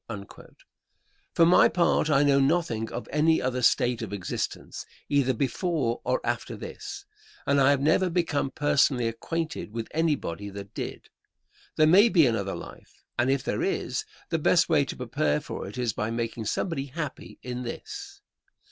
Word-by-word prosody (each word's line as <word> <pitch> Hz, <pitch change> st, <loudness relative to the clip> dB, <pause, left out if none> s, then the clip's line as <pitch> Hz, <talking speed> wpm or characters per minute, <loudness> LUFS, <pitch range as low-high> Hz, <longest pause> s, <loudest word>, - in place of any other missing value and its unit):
For 165 Hz, -, +6 dB
my 175 Hz, -, +6 dB
part, 170 Hz, -3 st, +2 dB
I 145 Hz, -1 st, +4 dB
know 140 Hz, -1 st, +4 dB
nothing 135 Hz, -7 st, +1 dB
of 120 Hz, -, -5 dB
any 160 Hz, +2 st, +3 dB
other 125 Hz, 0 st, -1 dB
state 120 Hz, 0 st, +3 dB
of 110 Hz, -4 st, -5 dB
existence, 100 Hz, -3 st, -4 dB, 0.3 s
either 140 Hz, -2 st, +3 dB
before 135 Hz, -, -1 dB
or -, -, +1 dB
after -, -, -2 dB
this, 400 Hz, -1 st, -8 dB, 0.4 s
and 140 Hz, 0 st, +3 dB
I 135 Hz, -, +5 dB
have 140 Hz, -1 st, +3 dB
never 165 Hz, +5 st, +3 dB
become 165 Hz, -5 st, 0 dB
personally 135 Hz, -4 st, +2 dB
acquainted 155 Hz, +4 st, -4 dB
with 115 Hz, 0 st, -4 dB
anybody 145 Hz, -, -1 dB
that 100 Hz, 0 st, -9 dB
did. -, -, -6 dB, 0.6 s
There 155 Hz, -, +5 dB
may 195 Hz, +9 st, +7 dB
be 170 Hz, -8 st, +5 dB
another 100 Hz, -5 st, 0 dB
life, -, -, -12 dB, 0.2 s
and 120 Hz, +2 st, +3 dB
if 135 Hz, -1 st, +1 dB
there -, -, -2 dB
is, -, -, -1 dB, 0.3 s
the -, -, 0 dB
best -, -, +4 dB
way -, -, +3 dB
to -, -, -6 dB
prepare 75 Hz, 0 st, 0 dB
for -, -, -6 dB
it 105 Hz, -, -9 dB
is 120 Hz, -3 st, 0 dB
by 105 Hz, -, -2 dB
making 115 Hz, -1 st, -3 dB
somebody 140 Hz, -, -2 dB
happy 145 Hz, -1 st, -6 dB
in 125 Hz, 0 st, -4 dB
this. 400 Hz, -, -7 dB
135 Hz, 165 wpm, -27 LUFS, 115-165 Hz, 0.6 s, may